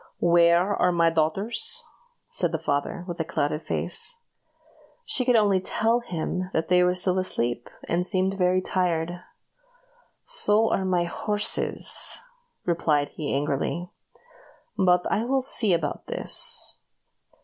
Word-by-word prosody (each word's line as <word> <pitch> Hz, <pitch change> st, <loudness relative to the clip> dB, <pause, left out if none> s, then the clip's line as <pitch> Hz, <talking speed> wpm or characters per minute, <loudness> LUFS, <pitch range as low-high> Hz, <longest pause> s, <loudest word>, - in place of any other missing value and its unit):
"Where 170 Hz, +3 st, +4 dB
are 180 Hz, -, +2 dB
my 170 Hz, -1 st, +3 dB
dear -, -, -11 dB
daughters?" 230 Hz, -, 0 dB, 0.5 s
said 175 Hz, -3 st, 0 dB
the 165 Hz, -, -1 dB
father, 150 Hz, +2 st, -2 dB
with 175 Hz, -1 st, -6 dB
a -, -, +1 dB
clouded 150 Hz, -1 st, -2 dB
face. 480 Hz, -, -1 dB, 0.9 s
She 430 Hz, -, +2 dB
could 250 Hz, -1 st, +3 dB
only 205 Hz, -4 st, +4 dB
tell 225 Hz, +5 st, +1 dB
him 185 Hz, -4 st, -4 dB
that 160 Hz, +1 st, -1 dB
they 180 Hz, 0 st, +5 dB
were 180 Hz, 0 st, +2 dB
still 185 Hz, 0 st, +1 dB
asleep, 120 Hz, -10 st, -2 dB, 0.2 s
and 175 Hz, +1 st, 0 dB
seemed 185 Hz, +1 st, +2 dB
very 185 Hz, -1 st, +1 dB
tired. 175 Hz, -2 st, -1 dB, 1.1 s
"So 225 Hz, -, +2 dB
are 190 Hz, -, 0 dB
my 180 Hz, -2 st, +1 dB
horses," 210 Hz, +4 st, 0 dB, 0.5 s
replied 150 Hz, -4 st, +1 dB
he, 150 Hz, -3 st, -5 dB
angrily; 145 Hz, +5 st, -2 dB, 0.8 s
"but 180 Hz, -2 st, +3 dB
I 210 Hz, -, +1 dB
will 265 Hz, +2 st, 0 dB
see 220 Hz, -5 st, +3 dB
about 165 Hz, -4 st, -1 dB
this." -, -, -1 dB
180 Hz, 135 wpm, -25 LUFS, 165-205 Hz, 1.1 s, they